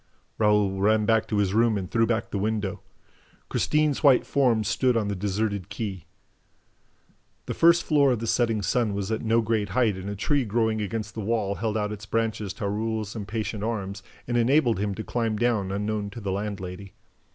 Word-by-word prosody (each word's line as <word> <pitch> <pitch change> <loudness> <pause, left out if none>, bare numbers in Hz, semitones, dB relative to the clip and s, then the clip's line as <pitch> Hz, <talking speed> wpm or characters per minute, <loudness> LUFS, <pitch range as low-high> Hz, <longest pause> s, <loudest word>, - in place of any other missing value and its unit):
Raoul 105 -3 +2
ran 105 +1 +3
back 110 0 +2
to 105 - -1
his 100 -2 +1
room 115 -1 +3
and 95 -2 -5
threw 115 -1 +2
back 115 -1 -1
the 100 - -2
window. 105 -1 -2 0.7
Christine's 150 -2 +1
white 135 -4 +5
form 125 -6 +2
stood 120 +4 +1
on 105 -2 0
the 100 - -2
deserted 100 0 -2
quay. 100 -4 -5 1.4
The - - -3
first 170 +1 +5
floor 145 -3 +3
of - - -1
the 115 - -4
Setting 115 -2 +1
Sun 110 -2 +1
was 100 +1 -3
at 110 - -1
no 115 +1 +2
great 110 -2 -1
height 115 -6 +3
and 95 +1 -6
a 100 - -4
tree 140 +7 +1
growing 110 0 0
against 105 +1 -4
the 110 - -5
wall 105 -2 0
held 110 +1 -2
out 105 -1 -1
its 105 -1 -7
branches 110 -3 -1
to 100 - -4
Raoul's 110 +1 -2
impatient 105 0 -4
arms 100 -3 -3 0.3
and 120 0 0
enabled 120 -2 +3
him 100 -1 -1
to 110 - -5
climb 115 -2 -1
down 110 -4 +1
unknown 105 +1 -2
to 100 - -9
the 100 -3 -3
landlady. 100 -1 -5
110 Hz, 195 wpm, -26 LUFS, 100-115 Hz, 1.4 s, white